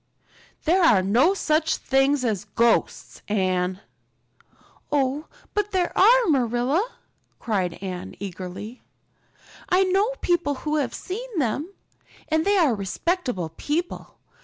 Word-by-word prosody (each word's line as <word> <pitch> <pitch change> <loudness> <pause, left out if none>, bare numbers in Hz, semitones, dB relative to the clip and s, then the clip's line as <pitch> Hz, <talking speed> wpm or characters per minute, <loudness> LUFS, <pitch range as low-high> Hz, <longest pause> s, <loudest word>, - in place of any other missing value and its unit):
"There 355 +4 +3
are 210 - +5
no 245 - +3
such 315 -3 +1
things 270 0 +2
as 210 -3 -1
ghosts, 230 +3 0
Anne." 185 -2 0 1.1
"Oh, 285 +1 0 0.3
but 415 -1 0
there 370 -3 -1
are, 475 +5 +6
Marilla," 265 - +1 0.5
cried 190 -7 -1
Anne 180 -2 -6
eagerly. 190 +4 -7 0.9
"I 375 0 +4
know 390 +6 +1
people 345 -5 +1
who 305 0 +1
have 290 - -1
seen 450 +3 -6
them. 285 - -1 0.6
And 315 0 +1
they 405 0 +3
are 315 -9 +4
respectable 210 - -2
people. 335 +4 -3
285 Hz, 115 wpm, -24 LUFS, -, 1.1 s, are